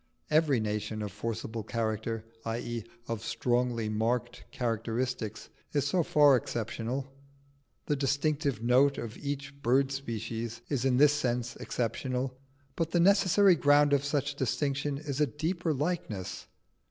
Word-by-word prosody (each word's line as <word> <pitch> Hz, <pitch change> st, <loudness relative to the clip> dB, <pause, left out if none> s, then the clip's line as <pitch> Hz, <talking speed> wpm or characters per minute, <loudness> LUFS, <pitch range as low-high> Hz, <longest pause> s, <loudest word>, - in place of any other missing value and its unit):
Every 150 Hz, -4 st, +4 dB
nation 105 Hz, 0 st, -2 dB
of 105 Hz, -, -4 dB
forcible 115 Hz, +2 st, -4 dB
character 110 Hz, 0 st, -2 dB, 0.2 s
i.e., 115 Hz, 0 st, -3 dB, 0.2 s
of 115 Hz, -1 st, -3 dB
strongly 120 Hz, 0 st, 0 dB
marked 110 Hz, +3 st, -1 dB
characteristics, 115 Hz, -1 st, -2 dB, 0.2 s
is 145 Hz, -2 st, +1 dB
so 175 Hz, +5 st, +2 dB
far 145 Hz, -3 st, +5 dB
exceptional. 120 Hz, +3 st, -3 dB, 0.7 s
The 145 Hz, -, +1 dB
distinctive 140 Hz, -2 st, 0 dB
note 130 Hz, +4 st, +4 dB
of 115 Hz, -2 st, -5 dB
each 140 Hz, 0 st, -5 dB
bird 135 Hz, +3 st, +3 dB
species 115 Hz, -3 st, -4 dB
is 135 Hz, -3 st, 0 dB
in 130 Hz, -2 st, +3 dB
this 145 Hz, +1 st, +6 dB
sense 125 Hz, -4 st, -1 dB
exceptional, 125 Hz, +2 st, -2 dB, 0.4 s
but 165 Hz, -2 st, -1 dB
the 175 Hz, -, +1 dB
necessary 195 Hz, +1 st, +5 dB
ground 145 Hz, -2 st, +4 dB
of 140 Hz, -1 st, +3 dB
such 145 Hz, -1 st, 0 dB
distinction 140 Hz, +2 st, -1 dB
is 145 Hz, -1 st, -3 dB
a 150 Hz, -, +4 dB
deeper 165 Hz, +5 st, -1 dB
likeness. 145 Hz, -, -3 dB
130 Hz, 130 wpm, -30 LUFS, 115-145 Hz, 0.7 s, this